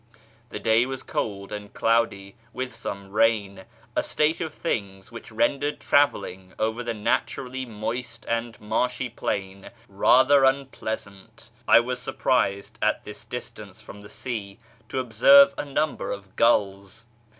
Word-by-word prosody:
The - - -6
day 115 +3 +3
was 130 -1 -5
cold 100 -2 -4
and 105 -1 -7
cloudy 115 -3 +1 0.2
with 125 -1 -4
some 100 -4 -7
rain, 100 -3 +1 0.3
a - - +3
state 155 +3 0
of 160 -2 -3
things 100 - -4
wliich 115 - -10
rendered 145 +6 0
travelling 95 -10 +1
over 110 +2 -1
the 115 -1 -3
naturally 130 +3 -2
moist 115 +2 -5
and 115 0 -2
marshy 125 +4 -1
plain 95 -3 -4 0.2
rather 130 +7 +5
unpleasant. 110 -7 -3 0.2
I 115 - +7
was 125 +1 -3
surprised, 100 -8 -1
at - - +1
this - - -9
distance - - -8
from 100 - -11
the 100 - -13
sea, 105 -6 -6 0.3
to - - -4
observe 135 +3 +6
a - - -4
number 150 0 -2
of 100 -1 -8
gulls. 100 -1 +1
115 Hz, 140 wpm, -25 LUFS, 100-130 Hz, 0.3 s, I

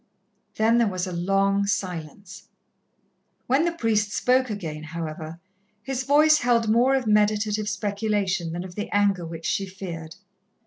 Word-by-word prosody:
Then 225 +2 +3
there 235 - +3
was 185 -2 -2
a 185 - -5
long 195 +3 +1
silence. 180 -1 -5 1.0
When 275 +6 +2
the 340 - +1
priest 220 -9 0
spoke 255 +4 +2
again, 165 -8 -5
however, 160 0 -6 0.4
his 265 -1 -3
voice 305 +2 +5
held 235 -2 +2
more 240 +5 +4
of 265 -2 -1
meditative 210 0 +2
speculation 200 -5 -1
than 175 +2 -4
of 185 -1 -9
the 210 +3 -5
anger 200 -4 +1
which 165 0 -8
she 195 - -1
feared. 170 -4 -8
205 Hz, 145 wpm, -24 LUFS, 175-225 Hz, 1.0 s, voice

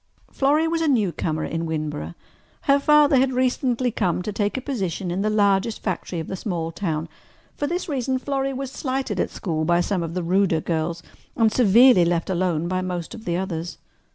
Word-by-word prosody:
Florrie 295 +4 +2
was 330 0 0
a 325 - +1
newcomer 180 - 0
in 165 0 -3
Winboro. 150 - -4 0.5
Her 280 0 +3
father 295 -1 +5
had 260 0 +2
recently 250 -1 +1
come 180 -4 -1
to 210 - -4
take 205 +3 -1
a - - -3
position 195 - -3
in 185 +3 -1
the 215 - +1
largest 205 +1 +1
factory 180 -2 -3
of 160 - -4
the 190 - -5
small 175 -5 -3
town. 160 -3 -3 0.5
For 290 - -2
this 350 +4 -2
reason 265 -3 -1
Florrie 275 +1 -2
was 265 0 -5
slighted 260 -8 -3
at - - 0
school 160 -5 -3
by 170 +2 +3
some 180 +1 0
of 165 0 -4
the 180 - -1
ruder 180 -1 +2
girls 165 +1 -2 0.3
and 225 -2 +4
severely 235 -2 +6
left 170 +1 0
alone 175 -3 0
by 185 +1 -1
most 180 -2 -4
of 225 - -10
the 175 0 0
others. 175 -2 -4
195 Hz, 195 wpm, -23 LUFS, 170-255 Hz, 0.5 s, severely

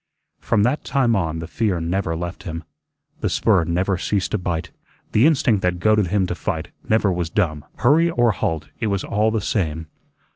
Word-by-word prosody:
From 105 -3 +1
that 130 +6 +1
time 130 -4 +2
on 80 -5 -1
the 80 0 -5
fear 100 -1 0
never 85 0 -1
left 85 +2 -5
him, 85 -1 -6 0.6
the - - -1
spur 85 - +2
never 90 +3 0
ceased 100 -1 -1
to 105 - 0
bite, 85 -2 -3 0.4
the 115 +7 +5
instinct 125 -10 +2
that 90 -1 0
goaded 105 0 +3
him 95 +1 +1
to 90 - -2
fight 80 - -3 0.2
never 110 -3 +3
was 85 -2 -2
dumb; 80 -6 0
hurry 155 +7 +4
or 120 -8 +3
halt, 80 -4 -2
it 110 - -1
was 100 -2 -1
all 105 +2 +1
the 110 -1 -1
same. 80 -6 -1
95 Hz, 190 wpm, -22 LUFS, 85-110 Hz, 0.6 s, the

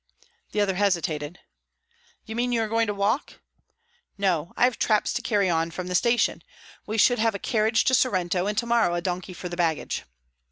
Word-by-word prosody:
The 210 - -2
other 200 -2 +1
hesitated. 170 -5 -1 0.8
"You 220 - -7
mean 245 +1 0
you 230 -2 +1
are - - -2
going 225 +1 +1
to - - 0
walk?" 205 +8 -1 0.8
"No. 180 -5 0
I - - +2
have 245 0 +2
traps 215 -2 +2
to - - -2
carry 205 -4 +1
on 165 -1 +1
from 180 +2 -6
the 180 - -4
station. 235 +6 +2 0.5
We 220 - -2
should 245 +2 +4
have 225 -1 +2
a - - -1
carriage 220 +2 +1
to 260 - +1
Sorrento, 185 -7 +1
and 210 0 -2
to 235 - +1
morrow 235 -7 +2
a 175 - -1
donkey 180 +1 -4
for 180 - -6
the 175 0 -6
baggage." 165 -3 -1
200 Hz, 200 wpm, -25 LUFS, 175-225 Hz, 0.8 s, should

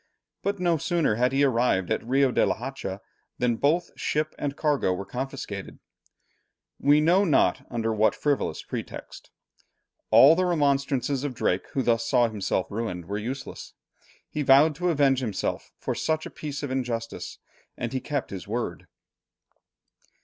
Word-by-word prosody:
But 200 0 -2
no 175 -2 +2
sooner 165 -4 +1
had 125 +4 +2
he 135 +1 +2
arrived 120 -8 +2
at - - 0
Rio 135 +2 +2
de - - +2
la - - +2
Hacha, 110 -6 -6 0.4
than 125 -1 +1
both 160 +8 +1
ship 155 +1 -1
and 140 0 -3
cargo 145 - +1
were 90 +2 -3
confiscated, 130 +5 -6 1.0
we 145 +1 +5
know 175 +6 +4
not 160 -8 +2
under 115 -2 -1
what 110 0 +3
frivolous 145 -2 -1
pretext. - - -7 0.8
All 130 +8 +8
the 185 +2 +1
remonstrances 140 -4 +1
of 140 -4 -3
Drake, 90 -4 0
who 135 - 0
thus 115 -1 +2
saw 120 +1 +3
himself 100 -3 -1
ruined, 100 -5 -4
were 100 +4 -3
useless. 130 +5 -6 0.5
He 150 - -4
vowed 145 +3 +6
to 180 +1 0
avenge 140 -5 +3
himself 110 -7 -3
for - - -3
such 155 0 -1
a - - -7
piece 150 -1 -6
of 140 - -3
injustice, 120 -3 -3 0.4
and 120 +1 -4
he 130 - -1
kept 145 -3 -3
his 95 -2 -7
word. 120 +3 -4
135 Hz, 155 wpm, -26 LUFS, 115-150 Hz, 1.0 s, All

